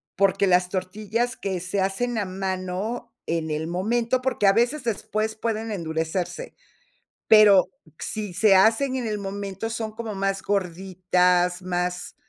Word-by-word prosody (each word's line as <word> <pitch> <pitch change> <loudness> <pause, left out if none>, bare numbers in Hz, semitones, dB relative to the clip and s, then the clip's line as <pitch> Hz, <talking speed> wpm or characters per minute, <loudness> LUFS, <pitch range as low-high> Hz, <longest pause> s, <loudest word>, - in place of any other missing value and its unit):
porque 195 +1 +3
las 180 -1 +3
tortillas 215 +6 -2
que 190 -2 -3
se 185 +2 -2
hacen 220 +5 -1
a 205 - -1
mano 190 +4 -4
en 165 -1 -2
el 155 +1 -2
momento 230 +8 0
porque 250 -5 0
a 195 - +6
veces 245 +6 +1
después 220 -1 -2
pueden 225 0 -3
endurecerse, 165 - -3 0.7
pero 210 -3 +7 0.3
si 210 -4 -4
se 195 +1 +5
hacen 225 +7 +4
en 245 -3 -2
el 210 -1 -2
momento, 200 +2 -5
son 225 -1 -3
como 220 -1 -6
más 195 0 -1
gorditas, 180 -1 +1
más 180 0 -3
195 Hz, 140 wpm, -24 LUFS, 180-220 Hz, 0.7 s, pero